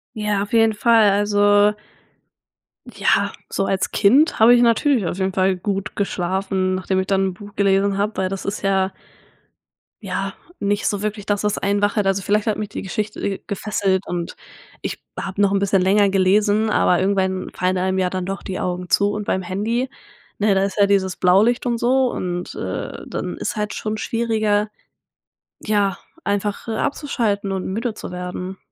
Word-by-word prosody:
Ja, 210 Hz, -2 st, 0 dB
auf 205 Hz, +4 st, -5 dB
jeden 225 Hz, -1 st, +4 dB
Fall, 220 Hz, -1 st, +4 dB
also 205 Hz, 0 st, +3 dB, 1.1 s
ja, -, -, +1 dB, 0.2 s
so 195 Hz, -, -1 dB
als 190 Hz, -1 st, -1 dB
Kind 275 Hz, +11 st, +4 dB
habe 225 Hz, +2 st, +7 dB
ich 240 Hz, -, +4 dB
natürlich 235 Hz, 0 st, +3 dB
auf 175 Hz, -, -3 dB
jeden 190 Hz, 0 st, -1 dB
Fall 190 Hz, 0 st, +2 dB
gut 195 Hz, +1 st, -3 dB
geschlafen, 190 Hz, -1 st, -1 dB
nachdem 185 Hz, 0 st, -1 dB
ich 190 Hz, -, -2 dB
dann 195 Hz, -1 st, +2 dB
'n 190 Hz, -, -3 dB
Buch 205 Hz, +2 st, -12 dB
gelesen 195 Hz, 0 st, +2 dB
hab, 210 Hz, +2 st, -1 dB
weil 190 Hz, -1 st, 0 dB
das 195 Hz, 0 st, -5 dB
ist 200 Hz, -, -3 dB
ja 195 Hz, -1 st, +1 dB, 1.1 s
ja, 195 Hz, -1 st, -3 dB, 0.3 s
nicht 205 Hz, 0 st, 0 dB
so 205 Hz, -1 st, -1 dB
wirklich 210 Hz, -1 st, -3 dB
das, 205 Hz, -1 st, -1 dB
was 210 Hz, -1 st, 0 dB
einen 200 Hz, +1 st, 0 dB
wach 205 Hz, +1 st, +1 dB
hält. 205 Hz, -2 st, +2 dB
Also, 195 Hz, 0 st, +1 dB
vielleicht 210 Hz, +3 st, 0 dB
hat 215 Hz, -, +1 dB
mich 210 Hz, -1 st, -4 dB
die -, -, -6 dB
Geschichte, 210 Hz, +2 st, -4 dB
äh, 195 Hz, -1 st, -2 dB
gefesselt 195 Hz, -2 st, -1 dB
und 175 Hz, -1 st, -4 dB, 0.5 s
ich -, -, -4 dB, 0.2 s
habe 195 Hz, 0 st, -3 dB
noch 200 Hz, -1 st, +4 dB
'n 200 Hz, -, +2 dB
bisschen 195 Hz, -1 st, +2 dB
länger 200 Hz, +2 st, +4 dB
gelesen, 205 Hz, +3 st, +3 dB
aber 180 Hz, -4 st, +3 dB
irgendwann 190 Hz, -1 st, 0 dB
fallen 185 Hz, +1 st, 0 dB
einem 190 Hz, +1 st, 0 dB
ja 185 Hz, -1 st, +1 dB
dann 185 Hz, 0 st, -3 dB
doch 195 Hz, +1 st, -4 dB
die 190 Hz, -, -5 dB
Augen 180 Hz, 0 st, -3 dB
zu 200 Hz, 0 st, +3 dB
und 210 Hz, 0 st, -4 dB
beim 190 Hz, -, 0 dB
Handy, 220 Hz, +8 st, -2 dB, 0.5 s
ne, 205 Hz, -1 st, +2 dB
da 190 Hz, -, +2 dB
ist 195 Hz, 0 st, -3 dB
ja 200 Hz, -, +6 dB
dieses 195 Hz, -2 st, +1 dB
Blaulicht 205 Hz, +8 st, +3 dB
und 240 Hz, -1 st, 0 dB
so 255 Hz, +2 st, +2 dB
und, 175 Hz, 0 st, -4 dB
äh, -, -, -5 dB
dann -, -, -4 dB
ist -, -, -3 dB
halt 210 Hz, 0 st, -2 dB
schon 215 Hz, 0 st, -3 dB
schwieriger, 215 Hz, -2 st, 0 dB, 0.9 s
ja, 205 Hz, -3 st, 0 dB, 0.3 s
einfach, 205 Hz, +1 st, -2 dB
äh, 225 Hz, -, -2 dB
abzuschalten 220 Hz, -7 st, -1 dB
und 190 Hz, -1 st, -3 dB
müde 220 Hz, +4 st, -3 dB
zu -, -, -8 dB
werden. 180 Hz, +1 st, -5 dB
200 Hz, 185 wpm, -21 LUFS, 190-210 Hz, 1.1 s, habe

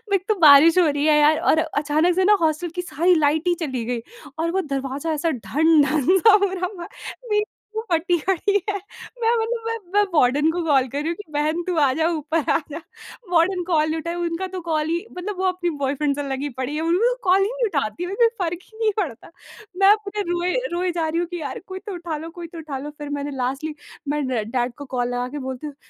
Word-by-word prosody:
एक 375 Hz, -, -1 dB
तो 430 Hz, -, +2 dB
बारिश 310 Hz, +2 st, +8 dB
हो 340 Hz, -, +5 dB
रही 290 Hz, +1 st, 0 dB
है 305 Hz, -1 st, +5 dB
यार, 300 Hz, +1 st, +4 dB
और 315 Hz, -, +3 dB
अचानक 315 Hz, +2 st, +1 dB
से 375 Hz, -, +2 dB
ना 415 Hz, -, +6 dB
हॉस्टल 320 Hz, +2 st, 0 dB
की 360 Hz, -, -1 dB
सारी 350 Hz, +1 st, +2 dB
लाइट 305 Hz, +3 st, +1 dB
ही 350 Hz, -, +4 dB
चली 255 Hz, -5 st, -3 dB
गई, 240 Hz, -1 st, -2 dB, 0.4 s
और 335 Hz, +1 st, 0 dB
वो 385 Hz, -, +1 dB
दरवाज़ा 275 Hz, +4 st, -3 dB
ऐसा 320 Hz, +2 st, 0 dB
ढन-ढन 305 Hz, +5 st, +3 dB
सा 435 Hz, +3 st, +6 dB
हो 380 Hz, -, -3 dB
रहा 365 Hz, -1 st, -2 dB
था। 350 Hz, -4 st, -9 dB, 0.4 s
मेरी 420 Hz, 0 st, +3 dB, 0.3 s
जो -, -, 0 dB
फटी 345 Hz, +2 st, +2 dB
पड़ी 385 Hz, +2 st, +1 dB, 0.2 s
है। 405 Hz, -, -1 dB, 0.5 s
मैं 455 Hz, +1 st, +3 dB
मतलब 455 Hz, +1 st, -2 dB
मैं 455 Hz, 0 st, -1 dB, 0.2 s
मैं 415 Hz, -, +5 dB
वार्डन 295 Hz, +2 st, +3 dB
को 350 Hz, -, -2 dB
कॉल 270 Hz, -4 st, +3 dB
कर 280 Hz, +4 st, -3 dB
रही 305 Hz, -, -3 dB
हूँ 335 Hz, -, -1 dB
कि, 415 Hz, -, -10 dB
"बहन, 305 Hz, +3 st, 0 dB
तू 360 Hz, -, 0 dB
आजा, 295 Hz, +3 st, +2 dB
ऊपर 315 Hz, -1 st, -1 dB
आजा।" 305 Hz, 0 st, -2 dB, 0.5 s
वार्डन 355 Hz, +2 st, +3 dB
कॉल 310 Hz, -3 st, +2 dB
नहीं 320 Hz, -, -1 dB
उठाईं, 335 Hz, +2 st, -4 dB
उनका 345 Hz, +2 st, -2 dB
तो 365 Hz, -, -4 dB
कॉल 315 Hz, -2 st, -1 dB
ही 340 Hz, +5 st, -1 dB
मतलब 380 Hz, +1 st, -4 dB
वो 380 Hz, -, -1 dB
अपनी 365 Hz, -1 st, 0 dB
बॉयफ्रेंड 280 Hz, +1 st, 0 dB
से 290 Hz, -, -3 dB
लगी 270 Hz, +2 st, -2 dB
पड़ी 260 Hz, +3 st, -2 dB
है। 310 Hz, -, -2 dB
उन 330 Hz, +1 st, +1 dB
लू 475 Hz, +6 st, +3 dB
कॉल 375 Hz, +1 st, +4 dB
ही 400 Hz, -, +1 dB
नहीं -, -, -1 dB
उठाती, 305 Hz, -, -2 dB
उन्हें 410 Hz, +6 st, +3 dB
फ़र्क 340 Hz, 0 st, -2 dB
ही 440 Hz, -, -20 dB
नहीं 440 Hz, -1 st, +2 dB
पड़ता। 325 Hz, -, -4 dB, 0.5 s
मैं 390 Hz, 0 st, +5 dB
अपने 420 Hz, -1 st, 0 dB
रोए 350 Hz, +1 st, 0 dB, 0.2 s
रोए 360 Hz, +1 st, 0 dB
जा 330 Hz, -2 st, -1 dB
रही 330 Hz, +2 st, -1 dB
हूँ 345 Hz, -, -1 dB
कि, 350 Hz, -2 st, -6 dB
"यार, 280 Hz, -3 st, -5 dB
कोई 375 Hz, 0 st, -6 dB
तो 400 Hz, -, -4 dB
उठा 340 Hz, -3 st, -4 dB
लो, 320 Hz, +2 st, -7 dB
कोई 340 Hz, -, -6 dB
तो 335 Hz, 0 st, -12 dB
उठा 300 Hz, -4 st, -5 dB
लो।" 290 Hz, -, -6 dB
फिर 295 Hz, -1 st, -7 dB
मैंने 285 Hz, +1 st, -4 dB
लास्टली, 275 Hz, +5 st, -3 dB, 0.3 s
मैं 295 Hz, -1 st, 0 dB
ड 240 Hz, -4 st, -1 dB
डैड 245 Hz, -1 st, -1 dB
को 285 Hz, -, -8 dB
कॉल 245 Hz, 0 st, 0 dB
लगा 245 Hz, 0 st, -2 dB
के -, -, -3 dB
बोलती 260 Hz, +3 st, -5 dB
हूँ, 290 Hz, -, -9 dB
325 Hz, 240 wpm, -22 LUFS, 290-360 Hz, 0.5 s, बारिश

